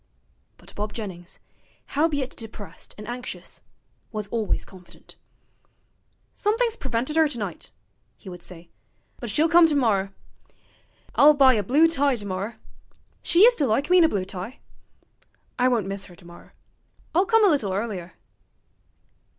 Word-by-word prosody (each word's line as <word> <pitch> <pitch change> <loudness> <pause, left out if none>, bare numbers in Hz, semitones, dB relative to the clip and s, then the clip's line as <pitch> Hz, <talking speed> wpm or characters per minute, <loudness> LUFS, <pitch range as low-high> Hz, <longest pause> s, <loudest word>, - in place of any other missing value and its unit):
But - - -14
Bob 210 0 -4
Jennings, 185 -6 -8 0.6
howbeit 285 -3 0
depressed 220 -3 -9
and 210 0 -9
anxious, 250 +1 -7 0.5
was 215 -2 -4
always 220 -3 -1
confident. 185 -2 -17 1.2
'Somethink's 455 +2 0
prevented 260 - -2
'er 320 - +5
tonight,' 210 - -6 0.5
he - - -17
would 180 -2 -8
say, 175 -1 -10 0.5
'but 240 - -6
she'll 300 +10 +2
come 340 0 +6
tomorrer.... 220 -10 +1 1.0
I'll 300 +1 +7
buy 270 -2 +6
a 215 - +1
blue 285 - +4
tie 285 -4 +2
tomorrer 205 0 -5 0.7
she 350 +4 +4
used 485 +1 +6
to 285 - +2
like 275 +9 0
me 365 - +7
in - - +6
a 320 - +5
blue 195 -7 -2
tie. 195 +6 -7 1.0
I 250 - +4
won't 235 -6 +1
miss 195 0 -5
'er 175 - -14
tomorrer. 175 0 -16 0.6
I'll 365 +4 +3
come 450 -2 +5
a - - +6
little 270 - +1
earlier.' 190 -3 -4
235 Hz, 140 wpm, -24 LUFS, 195-300 Hz, 1.2 s, I'll